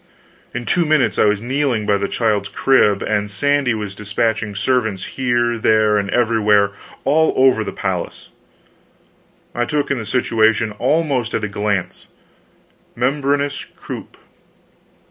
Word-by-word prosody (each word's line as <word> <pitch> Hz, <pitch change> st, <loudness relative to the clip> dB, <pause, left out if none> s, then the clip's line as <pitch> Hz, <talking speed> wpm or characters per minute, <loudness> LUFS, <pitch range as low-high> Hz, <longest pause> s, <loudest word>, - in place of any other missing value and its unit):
In 120 Hz, -, -5 dB
two 175 Hz, -, +2 dB
minutes 155 Hz, -3 st, +1 dB
I -, -, +5 dB
was 105 Hz, 0 st, +1 dB
kneeling 130 Hz, -4 st, 0 dB
by 100 Hz, -1 st, +2 dB
the 100 Hz, -, -1 dB
child's 105 Hz, -4 st, 0 dB
crib, 105 Hz, -7 st, +2 dB
and 105 Hz, -1 st, -1 dB
Sandy 140 Hz, +3 st, +1 dB
was 105 Hz, -2 st, -5 dB
dispatching 105 Hz, +1 st, -2 dB
servants 110 Hz, -2 st, 0 dB
here, 120 Hz, -2 st, -1 dB
there, 110 Hz, -1 st, +3 dB
and 100 Hz, -1 st, -3 dB
everywhere, 105 Hz, -4 st, +2 dB, 0.3 s
all 160 Hz, +3 st, +3 dB
over 130 Hz, -4 st, +4 dB
the -, -, -5 dB
palace. 95 Hz, -3 st, -4 dB, 1.2 s
I 120 Hz, -, -1 dB
took 145 Hz, +2 st, -1 dB
in 135 Hz, -, 0 dB
the 110 Hz, -, -6 dB
situation 110 Hz, -3 st, +1 dB
almost 135 Hz, -3 st, 0 dB
at 110 Hz, -, -2 dB
a -, -, 0 dB
glance 105 Hz, -2 st, -3 dB, 0.9 s
membranous 140 Hz, +3 st, 0 dB
croup! -, -, -10 dB
115 Hz, 135 wpm, -19 LUFS, 105-135 Hz, 1.2 s, I